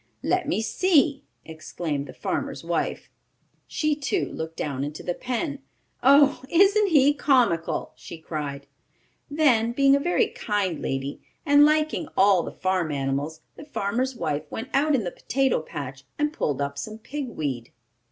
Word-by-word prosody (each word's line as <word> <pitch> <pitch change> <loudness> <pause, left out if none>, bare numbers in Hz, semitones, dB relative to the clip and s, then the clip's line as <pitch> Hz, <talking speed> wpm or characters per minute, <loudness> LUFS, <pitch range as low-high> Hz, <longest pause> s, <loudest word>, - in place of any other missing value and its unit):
"Let 365 -4 0
me 225 -7 0
see!" 290 - +2 0.2
exclaimed 155 -2 -5
the - - -10
farmer's - - -3
wife. - - -2 0.6
She, 305 -1 0
too, 305 +6 -2
looked 160 0 -6
down 140 -2 -3
into 145 +2 -6
the 175 - -1
pen. 260 - -3 0.4
"Oh, 280 +2 +5
isn't 400 +4 +4
he 290 -5 +5
comical!" 245 - +1
she 170 - -10
cried. 145 -3 -5 0.6
Then, 250 -7 +3
being 275 +2 +5
a - - +2
very 350 +5 +1
kind 200 -6 -2
lady, 135 +1 -3 0.2
and 290 0 +6
liking 310 +1 +1
all 195 -2 +5
the - - -6
farm 185 -4 -1
animals, 140 +3 -2 0.2
the - - -9
farmer's 255 0 -2
wife 150 -10 -2
went 235 +4 -6
out 290 +2 +3
in 235 - 0
the 175 - -3
potato 270 -8 0
patch 135 -3 -7
and 295 +1 0
pulled 145 - -1
up 140 0 -4
some 215 +8 -6
pig 270 +4 -6
weed. 135 - -4
225 Hz, 155 wpm, -25 LUFS, -, 0.6 s, and